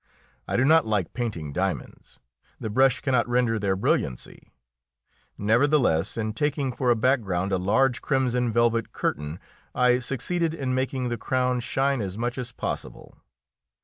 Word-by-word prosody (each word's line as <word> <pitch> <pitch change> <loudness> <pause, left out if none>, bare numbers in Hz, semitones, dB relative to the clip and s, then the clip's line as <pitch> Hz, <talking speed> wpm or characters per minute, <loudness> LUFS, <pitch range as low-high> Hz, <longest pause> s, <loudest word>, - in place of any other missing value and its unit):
I - - -1
do 125 - +3
not 160 -2 +5
like 105 -6 -1
painting 90 - -4
diamonds; 95 +2 -4 0.4
the 110 - -4
brush 130 +3 +3
cannot 125 -3 +1
render 120 -2 +1
their 100 -2 0
brilliancy. 65 -9 -2 0.9
Nevertheless, 115 - +2
in 110 -1 -2
taking 140 +1 -1
for 125 +1 -1
a 120 - +5
background 105 -7 0
a 95 - +1
large 120 +7 +2
crimson 125 -3 0
velvet 115 0 +1
curtain, 75 +3 -3 0.4
I 125 0 +4
succeeded 160 +6 -1
in 135 -5 -2
making 130 -1 -1
the 120 -1 -3
crown 125 +1 0
shine 135 +1 0
as 95 -1 -4
much 120 +2 -2
as 120 -1 -5
possible. - - -6
120 Hz, 145 wpm, -25 LUFS, 105-130 Hz, 0.9 s, not